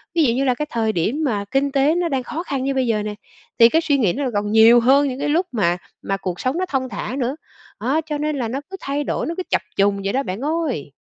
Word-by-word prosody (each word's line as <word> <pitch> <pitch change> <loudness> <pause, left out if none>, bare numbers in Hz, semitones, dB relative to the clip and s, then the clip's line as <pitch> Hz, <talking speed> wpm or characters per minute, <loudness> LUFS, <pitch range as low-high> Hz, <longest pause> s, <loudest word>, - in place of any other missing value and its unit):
Ví 330 - +4
dụ 240 -5 +3
như 265 +3 0
là 255 -2 +2
cái 300 - -2
thời 225 -2 0
điểm 220 - -1
mà 210 -6 -1
kinh 275 +1 +1
tế 280 +3 +3
nó 350 -1 0
đang 265 -3 -1
khó 320 +7 -5
khăn 275 -6 -3
như 275 +1 0
bây 260 -2 0
giờ 215 -2 0
nè, 210 0 -4 0.5
thì 230 0 +8
cái 325 +6 +2
suy 290 -3 +2
nghĩ 210 -10 +2
nó 280 +3 -2
còn 205 0 -1
nhiều 225 +2 +7
hơn 275 +4 +4
những 260 -1 -4
cái - - -1
lúc 335 +5 +2
mà 175 -7 +1 0.2
mà 195 - -2
cuộc 180 -2 -4
sống 260 +5 -1
nó 370 - 0
thong 260 -2 -1
thả 220 +4 -4
nữa, 255 +2 -1 0.4
đó, 270 +8 +1
cho 300 -2 -3
nên 300 +1 -1
là 240 - -1
nó 255 +5 -3
cứ 385 - -7
thay 280 +1 -2
đổi, - - -2
nó 330 - -2
cứ 370 - -2
trập - - +2
trùng 200 0 +2
vậy 195 - -1
đó 270 - +1
bạn 185 -4 -4
ơi. 290 - -2
260 Hz, 285 wpm, -21 LUFS, 220-290 Hz, 0.5 s, thì